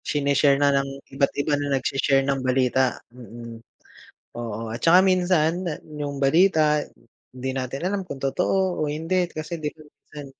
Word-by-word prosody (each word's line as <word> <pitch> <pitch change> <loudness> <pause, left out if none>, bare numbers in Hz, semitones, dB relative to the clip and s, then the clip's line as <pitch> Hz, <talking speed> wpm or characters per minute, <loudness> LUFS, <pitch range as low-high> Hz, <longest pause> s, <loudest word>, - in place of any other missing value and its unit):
shine-share 140 -1 +2
na 145 0 +3
ng 140 0 +1 0.2
iba't 140 0 +1
iba 145 +1 -1
na 140 -1 0
nag-she-share 135 +1 +1
ng 135 -1 0
balita, 130 0 +1 0.2
mm. 115 -1 -10 0.7
Oo, 115 -1 -5
at 120 - -7
saka 170 +2 +6
minsan 180 -2 +2
na 165 -4 -3 0.2
yung 145 -1 -4
balita, 155 0 +3 0.5
'di 130 +1 -5
natin 135 +5 -3
alam 195 0 -1
kung 160 -7 -8
totoo 180 +7 0
o 150 - -1
hindi 170 +4 -1
kasi, 155 +1 -6
'di 150 - -1
ba, - - -13
minsan, 145 -1 -12
145 Hz, 160 wpm, -24 LUFS, 135-165 Hz, 0.7 s, saka